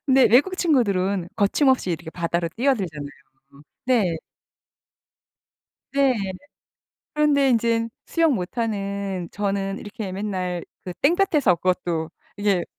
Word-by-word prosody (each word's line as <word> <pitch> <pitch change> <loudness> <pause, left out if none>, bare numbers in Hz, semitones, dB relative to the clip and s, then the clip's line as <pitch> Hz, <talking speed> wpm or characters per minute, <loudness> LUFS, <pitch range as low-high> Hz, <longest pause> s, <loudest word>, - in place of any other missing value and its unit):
근데 265 0 +5
외국 290 - +4
친구들은 200 - +1
거침없이 240 +1 +2
이렇게 165 -1 -4
바다로 170 0 -1
뛰어들잖아요. 195 - 0 0.8
네. 215 -10 +2 1.8
네. 275 -1 +3 1.0
그런데 290 -2 +3
인젠 230 -1 +1 0.2
수영 330 -4 +2
못하는 200 -3 -3
저는 195 -1 -2
이렇게 205 -2 -6
맨날 185 -3 -3 0.2
그 180 - -5
땡볕에서 300 - +3
그것도 175 -3 -1 0.3
이게 205 -3 +1
200 Hz, 250 characters per minute, -23 LUFS, 180-260 Hz, 1.8 s, 근데